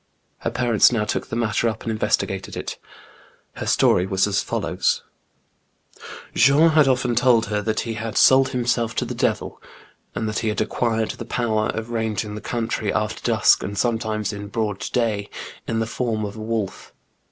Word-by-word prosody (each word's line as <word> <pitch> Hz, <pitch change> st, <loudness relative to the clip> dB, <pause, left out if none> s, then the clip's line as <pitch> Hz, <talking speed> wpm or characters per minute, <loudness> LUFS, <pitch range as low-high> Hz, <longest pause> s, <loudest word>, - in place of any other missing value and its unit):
Her -, -, -2 dB
parents 120 Hz, -3 st, +4 dB
now 110 Hz, -3 st, 0 dB
took -, -, -2 dB
the -, -, -5 dB
matter 115 Hz, 0 st, +1 dB
up 110 Hz, 0 st, -6 dB
and 115 Hz, -, -2 dB
investigated 110 Hz, -, -1 dB
it. -, -, -5 dB, 0.8 s
Her -, -, -4 dB
story 90 Hz, +1 st, +3 dB
was 95 Hz, 0 st, +2 dB
as 100 Hz, -1 st, +1 dB
follows: -, -, -1 dB, 0.6 s
— -, -, -16 dB
Jean 140 Hz, +6 st, +5 dB
had 155 Hz, -2 st, +5 dB
often 125 Hz, -2 st, +1 dB
told 120 Hz, -1 st, +4 dB
her 105 Hz, 0 st, -1 dB
that 110 Hz, +1 st, -1 dB
he 115 Hz, -, -4 dB
had 110 Hz, 0 st, -4 dB
sold 130 Hz, 0 st, +6 dB
himself 120 Hz, -2 st, 0 dB
to -, -, 0 dB
the -, -, -4 dB
devil, -, -, -2 dB, 0.5 s
and 110 Hz, -, -2 dB
that 110 Hz, -, -1 dB
he 115 Hz, -, -2 dB
had 105 Hz, -, -1 dB
acquired 115 Hz, -2 st, 0 dB
the -, -, -8 dB
power 110 Hz, -3 st, 0 dB
of 110 Hz, +1 st, -5 dB
ranging 110 Hz, -2 st, -2 dB
the 105 Hz, -, -6 dB
country 115 Hz, -2 st, -2 dB
after -, -, -2 dB
dusk, -, -, +4 dB
and 100 Hz, 0 st, -5 dB
sometimes 110 Hz, -2 st, -1 dB
in 100 Hz, 0 st, -6 dB
broad 105 Hz, -2 st, -2 dB
day, 110 Hz, -4 st, 0 dB, 0.4 s
in 115 Hz, -, -1 dB
the 115 Hz, -, 0 dB
form 110 Hz, -2 st, -2 dB
of 100 Hz, +1 st, -6 dB
a 110 Hz, -, -7 dB
wolf. 110 Hz, -3 st, -4 dB
110 Hz, 185 wpm, -22 LUFS, 105-120 Hz, 0.8 s, sold